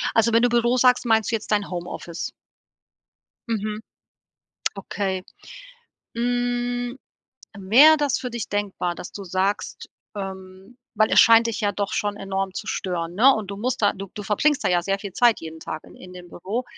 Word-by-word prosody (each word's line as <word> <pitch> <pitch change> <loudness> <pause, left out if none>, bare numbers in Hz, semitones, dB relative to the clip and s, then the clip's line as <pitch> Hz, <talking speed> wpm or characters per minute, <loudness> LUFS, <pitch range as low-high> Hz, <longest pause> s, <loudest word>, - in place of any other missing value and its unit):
Also, 225 0 +3
wenn 230 - +5
du 245 - +4
Büro 240 +1 +2
sagst, 250 0 +4
meinst 225 -1 +2
du - - +2
jetzt 215 - -6
dein 205 -1 +1
Home-Office? 175 -1 -6 1.2
Mhm. 215 -1 -2 1.0
Okay, 195 -1 -3 0.9
hm, 245 +1 -1 0.6
wäre 250 +12 +6
das 290 -4 0
für 250 - -5
dich 235 -2 -5
denkbar, 200 -4 -2
dass 175 - -9
du 200 - -8
sagst 190 +3 -2 0.3
ähm, 190 +3 -8 0.2
weil 215 0 +3
es - - +8
scheint 230 0 +6
dich 230 -2 -3
ja 205 -2 +1
doch 200 0 -3
schon 205 0 -1
enorm 195 -1 -3
zu 210 - -6
stören, 175 -3 -3
ne, 260 +7 +6
und 215 -3 -5
du 200 - -5
musst 245 +2 -2
da, 205 - +4
du 195 0 -8
du 210 - -6
verbringst 275 +8 +1
da - - +3
ja 175 -1 +3
sehr 195 +2 -1
viel 200 -1 -7
Zeit 240 +1 +3
jeden 160 0 -9
Tag 155 - -6
in - - -15
in 180 - -13
dem 180 -1 -11
Büro. 205 +10 -4
205 Hz, 180 wpm, -23 LUFS, 190-240 Hz, 1.2 s, es